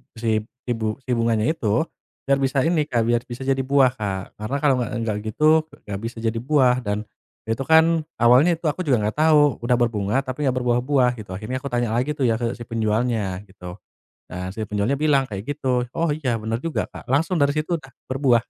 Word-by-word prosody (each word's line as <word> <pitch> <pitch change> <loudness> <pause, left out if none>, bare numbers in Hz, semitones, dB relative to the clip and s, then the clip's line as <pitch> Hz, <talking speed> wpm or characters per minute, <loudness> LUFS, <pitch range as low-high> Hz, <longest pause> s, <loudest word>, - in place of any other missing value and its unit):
si 115 0 -2 0.4
ibu 110 -2 -1
si 130 - -4
bunganya 115 -2 +1
itu, 160 -9 -4 0.6
biar 140 0 +2
bisa 135 -1 +1
ini 155 -3 +1
Kak, 120 -5 +1
biar 120 +1 +1
bisa 125 +2 -7
jadi 135 0 +1
buah, 135 -1 +3
Kak. 95 -2 -4
Karena 110 +6 -3
kalau 140 -3 +4
nggak 120 - -2
nggak 110 -2 -1
gitu, 110 +8 -3 0.4
nggak 100 -1 -5
bisa 115 +1 -5
jadi 115 0 0
buah. 130 -1 +3
Dan, 105 -3 -2 0.4
itu 115 +1 -3
kan, 160 0 +4
awalnya 125 +9 +5
itu 165 - -21
aku 180 0 -6
juga 120 -6 +2
nggak 105 - -1
tahu. 150 -3 +4
Udah 120 +1 +1
berbunga, 110 -3 0
tapi 135 +2 -3
nggak 130 - +1
berbuah-buah, 125 +1 +2
gitu. 105 - -10
Akhirnya 110 +7 -4
aku 140 - -6
tanya 120 -3 -1
lagi 125 +6 0
tuh 145 - -2
ya, 115 -2 +2
ke 120 -1 -2
si 120 - -8
penjualnya, 110 -4 -1
gitu. 90 -3 -10 0.5
Nah, 90 +1 -5
si 100 - -10
penjualnya 105 +7 -1
bilang 145 -3 +3
kayak 100 -6 -6
gitu. 125 -3 0
Oh, 165 -2 +1
iya, 140 -6 -1
benar 115 +1 -3
juga, 165 +4 -2
Kak. - - -11
Langsung 165 +7 +1
dari 140 0 +2
situ 155 +2 -1
udah, 135 -2 -16 0.2
berbuah. 130 -4 +3
125 Hz, 210 wpm, -23 LUFS, 110-140 Hz, 0.6 s, awalnya